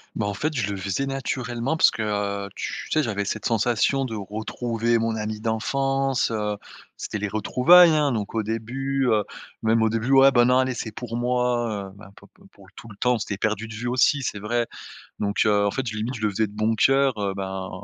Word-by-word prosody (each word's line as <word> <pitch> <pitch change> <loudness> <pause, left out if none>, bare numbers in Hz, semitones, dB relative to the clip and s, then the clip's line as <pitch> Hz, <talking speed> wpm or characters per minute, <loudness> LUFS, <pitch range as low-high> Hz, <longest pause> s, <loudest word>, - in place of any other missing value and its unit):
Bah, 105 - -1
en 105 - -2
fait, 155 +9 -2
je 105 -5 -1
le 100 - -4
faisais 100 +8 -2
naturellement, 130 +1 -2
parce - - +6
que, - - -5
heu, 100 -1 -2
tu - - -5
sais, 155 - +2
j'avais 100 -3 -2
cette - - -4
sensation 120 +4 +1
de 115 -3 -5
retrouver 115 +3 -2
mon 115 0 -1
ami 105 0 -4
d'enfance, 135 +4 0
heu, 105 -1 -1 0.4
c'était 105 - -4
les 105 - -2
retrouvailles, 155 - +5
hein, 150 -2 +2
donc 105 -3 -3
au 110 - 0
début, 130 +5 -2
heu, 105 -2 +3 0.4
même 110 0 +2
au 110 - +3
début: 115 +3 -2
«Ouais, 135 0 +7
bah, 120 -2 +4
non, 125 +1 +4
allez, 130 0 +1
c'est 115 -2 -5
pour 115 +1 -6
moi», 120 -5 -1
heu, - - -18
bah, 100 -1 -13
p - - -17
p - - -23
pour - - -18
tout - - -11
le 105 - -12
temps 125 +4 +2
où - - +3
on - - -1
s'était 100 -2 -4
perdu 110 +1 -1
de 110 - -9
vue 120 +3 -4
aussi, 130 +3 +2
c'est 105 -4 -3
vrai, 120 +3 -1 0.5
donc 100 0 0
heu, 105 -1 +3
en - - 0
fait, 130 - -3
j 110 - -4
limite, 115 +5 -3
je 110 - -8
le 105 - +2
faisais 110 +2 0
de 100 - -14
bon 110 +1 0
cœur, 135 +4 +3
heu, 100 -1 -1
ben, 95 -1 -5
115 Hz, 235 wpm, -24 LUFS, 105-125 Hz, 0.5 s, Ouais